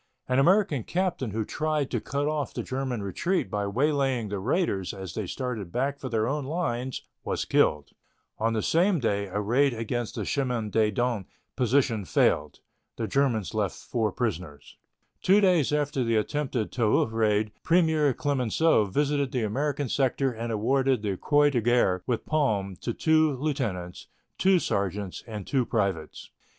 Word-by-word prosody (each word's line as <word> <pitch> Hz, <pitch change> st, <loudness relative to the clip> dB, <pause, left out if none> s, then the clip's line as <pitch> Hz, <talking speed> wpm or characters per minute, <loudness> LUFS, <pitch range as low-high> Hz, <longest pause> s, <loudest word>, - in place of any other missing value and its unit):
An 125 Hz, +1 st, +2 dB
American 175 Hz, -, +3 dB
captain 175 Hz, -, -1 dB
who 110 Hz, +1 st, -2 dB
tried 155 Hz, -2 st, -1 dB
to 120 Hz, -, -1 dB
cut 145 Hz, +1 st, -2 dB
off 150 Hz, -2 st, -2 dB
the -, -, -2 dB
German 130 Hz, -4 st, -3 dB
retreat 135 Hz, -, -1 dB
by 100 Hz, -1 st, -1 dB
waylaying 135 Hz, -1 st, 0 dB
the 100 Hz, -1 st, -3 dB
raiders 105 Hz, -, -1 dB
as 95 Hz, -4 st, -7 dB
they 105 Hz, -4 st, -3 dB
started 115 Hz, -6 st, -4 dB
back 140 Hz, +5 st, -1 dB
for 130 Hz, -, -5 dB
their 110 Hz, -1 st, 0 dB
own 145 Hz, +2 st, -1 dB
lines 130 Hz, -4 st, -3 dB, 0.2 s
was -, -, -2 dB
killed. 75 Hz, -2 st, +2 dB, 0.5 s
On 115 Hz, +1 st, +1 dB
the 110 Hz, -, -1 dB
same 175 Hz, +2 st, +3 dB
day 100 Hz, -4 st, 0 dB
a 95 Hz, +2 st, -3 dB
raid 125 Hz, +5 st, +2 dB
against 115 Hz, +1 st, -3 dB
the -, -, -3 dB
Chemin 125 Hz, -6 st, -1 dB
des 110 Hz, 0 st, +3 dB
Dames 115 Hz, -2 st, -1 dB, 0.3 s
position 125 Hz, -4 st, +1 dB
failed. 75 Hz, -2 st, +1 dB, 0.4 s
The 115 Hz, -, -2 dB
Germans 115 Hz, -, 0 dB
left -, -, -1 dB
four 110 Hz, -3 st, -2 dB
prisoners. 90 Hz, -, -4 dB, 0.5 s
Two 195 Hz, +3 st, +5 dB
days 180 Hz, -9 st, +3 dB
after 145 Hz, -3 st, 0 dB
the 115 Hz, -1 st, +1 dB
attempted 125 Hz, 0 st, -1 dB
Toul 115 Hz, -4 st, +2 dB
raid 110 Hz, -1 st, +1 dB
Premier 160 Hz, -4 st, +3 dB
Clemenceau 135 Hz, -1 st, +2 dB
visited 140 Hz, +5 st, 0 dB
the 125 Hz, -3 st, -1 dB
American 140 Hz, +6 st, -1 dB
sector 135 Hz, +1 st, +1 dB
and 115 Hz, 0 st, -4 dB
awarded 130 Hz, +2 st, +1 dB
the 100 Hz, -2 st, -1 dB
Croix 145 Hz, +7 st, +3 dB
de 120 Hz, -4 st, +1 dB
Guerre 110 Hz, -6 st, +2 dB
with 120 Hz, -3 st, -1 dB
palm 105 Hz, -11 st, 0 dB
to 120 Hz, -, -3 dB
two 155 Hz, -2 st, +3 dB
lieutenants, 115 Hz, -, -3 dB, 0.3 s
two 190 Hz, 0 st, +5 dB
sergeants, 100 Hz, -, -2 dB
and 105 Hz, -4 st, -6 dB
two 135 Hz, -3 st, +1 dB
privates. 100 Hz, -9 st, -2 dB
125 Hz, 160 wpm, -27 LUFS, 105-145 Hz, 0.5 s, Two